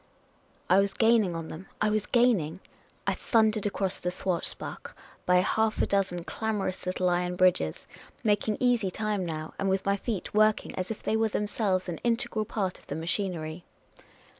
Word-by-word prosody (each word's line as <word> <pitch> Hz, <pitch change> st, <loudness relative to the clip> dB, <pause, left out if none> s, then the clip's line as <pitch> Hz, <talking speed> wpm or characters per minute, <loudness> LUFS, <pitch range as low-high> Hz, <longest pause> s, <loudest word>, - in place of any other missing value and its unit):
I 185 Hz, +2 st, +5 dB
was 195 Hz, 0 st, +1 dB
gaining 225 Hz, -6 st, +3 dB
on 165 Hz, -1 st, -5 dB
them; 175 Hz, +5 st, -8 dB
I 210 Hz, 0 st, +2 dB
was 215 Hz, -1 st, 0 dB
gaining! 205 Hz, -10 st, +2 dB, 0.5 s
I -, -, +2 dB
thundered 220 Hz, -2 st, +2 dB
across 195 Hz, -2 st, -2 dB
the 180 Hz, -, -1 dB
Schwarzbach, 180 Hz, -1 st, -3 dB, 0.3 s
bj* 180 Hz, 0 st, +5 dB
half 220 Hz, +2 st, +1 dB
a -, -, +3 dB
dozen 190 Hz, -3 st, 0 dB
clamorous 200 Hz, -3 st, -3 dB
little 185 Hz, 0 st, 0 dB
iron 180 Hz, 0 st, +1 dB
bridges, 180 Hz, -, +2 dB, 0.4 s
making 210 Hz, 0 st, +1 dB
easy 240 Hz, -6 st, +2 dB
time 210 Hz, 0 st, -1 dB
now, 155 Hz, -2 st, -5 dB
and 195 Hz, -, +1 dB
with 190 Hz, 0 st, 0 dB
my 200 Hz, 0 st, +2 dB
feet 205 Hz, -2 st, -4 dB
working 215 Hz, 0 st, +3 dB
as 185 Hz, 0 st, -3 dB
if 220 Hz, -, -5 dB
they -, -, +1 dB
were 220 Hz, 0 st, +2 dB
themselves 205 Hz, -3 st, 0 dB
an 170 Hz, -2 st, -4 dB
integral 230 Hz, -2 st, 0 dB
part 200 Hz, -4 st, -2 dB
of -, -, -21 dB
the -, -, -4 dB
machinery. 170 Hz, -1 st, -2 dB
195 Hz, 170 wpm, -28 LUFS, 180-215 Hz, 0.5 s, I